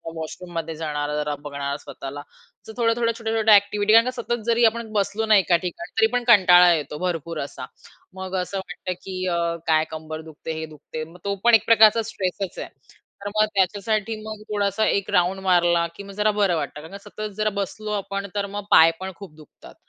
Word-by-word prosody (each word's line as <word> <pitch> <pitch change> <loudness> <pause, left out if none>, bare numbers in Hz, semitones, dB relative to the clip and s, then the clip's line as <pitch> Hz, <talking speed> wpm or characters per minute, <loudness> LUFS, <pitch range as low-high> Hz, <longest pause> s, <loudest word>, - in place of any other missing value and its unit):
वॉशरूममध्ये 165 0 -6
जाणारा 150 -2 -3
जरा 150 0 -2
बघणार 140 -1 -4
स्वतःला 140 0 -8
असं 220 +8 -16
थोड्या-थोड्या, 230 0 +1
छोट्या-छोट्या 220 -2 +3
एक्टिव्हिटी 205 +1 +2
कारण 230 +1 +7
का 255 - -1
सतत 240 0 -2
जरी 235 0 +2
आपण 225 0 0
बसलो 205 +2 0
ना, 220 -1 +5
एका 180 -2 +3
ठिकाणी 185 - -6
तरी 220 - +6
पण 245 0 +1
कंटाळा 180 -5 +7
येतो 150 -2 -3
भरपूर 170 -3 -3
असा. 140 - -6 0.5
मग 190 0 -6
असं 195 +2 -5
वाटतं 185 -1 -5
की 190 -1 -7
अ, 170 -1 0 0.3
काय 155 -1 +4
कंबर 155 0 -6
दुखते, 160 0 -8
हे 160 - -4
दुखते 155 0 -8
मग 165 +3 -13
तो 200 0 -1
पण 235 -1 +7
एक 220 - +2
प्रकारचा 225 0 +6
स्ट्रेसच 190 0 -4
आहे. - - -5 0.6
तर 205 - -3
मग 215 0 +4
त्याच्यासाठी 210 +3 0
मग 215 -1 -7
थोडासा 205 +1 0
1 200 0 0
राउंड 180 +2 +1
मारला 175 -1 +3
की 200 - -9
मग 200 - -10
जरा 215 0 +3
बरं 185 -4 +3
वाटतं 150 -1 -4
कारण 175 +6 -10
सतत 215 - -10 0.2
जरा 215 0 +1
बसलो 210 +2 -5
आपण 200 +1 -5
तर 200 0 0
मग 205 - -4
पाय 165 +1 +8
पण 190 0 -5
खूप 180 -6 -12
दुखतात 155 -2 -16
190 Hz, 195 wpm, -23 LUFS, 160-215 Hz, 0.6 s, पाय